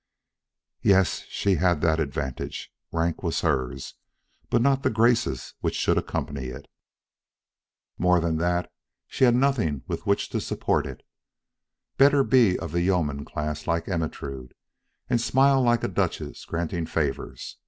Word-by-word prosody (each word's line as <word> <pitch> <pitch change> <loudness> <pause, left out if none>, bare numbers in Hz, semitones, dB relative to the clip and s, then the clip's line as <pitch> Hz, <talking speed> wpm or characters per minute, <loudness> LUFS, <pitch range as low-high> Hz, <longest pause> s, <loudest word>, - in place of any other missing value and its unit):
Yes, 95 -5 +3
she 100 -3 +1
had 90 +1 +2
that 80 -1 +2
advantage; 70 -3 -4 0.2
rank 85 0 -1
was 85 -3 -1
hers, 70 -4 -1 0.6
but 120 - +3
not 135 +2 +3
the - - +2
graces 115 - +1
which - - -2
should - - +2
accompany 70 -3 -4
it. 65 +2 -7 1.3
More 90 0 +4
than 80 -1 0
that, 85 +1 0 0.3
she 130 - +2
had 120 -1 +4
nothing 120 - +1
with - - -5
which - - +1
to - - -2
support - - -1
it. - - -10 0.9
Better 140 0 +6
be 120 -9 +4
of 80 - -6
the 85 +1 0
yeoman 80 -6 0
class 75 0 -4
like 85 -1 0
Ermentrude, 70 -7 -4 0.5
and 120 -2 +1
smile 135 +2 +4
like 120 -2 +2
a - - +1
duchess - - -3
granting 85 0 -3
favors. 75 -4 -3
85 Hz, 145 wpm, -25 LUFS, 75-115 Hz, 1.3 s, Better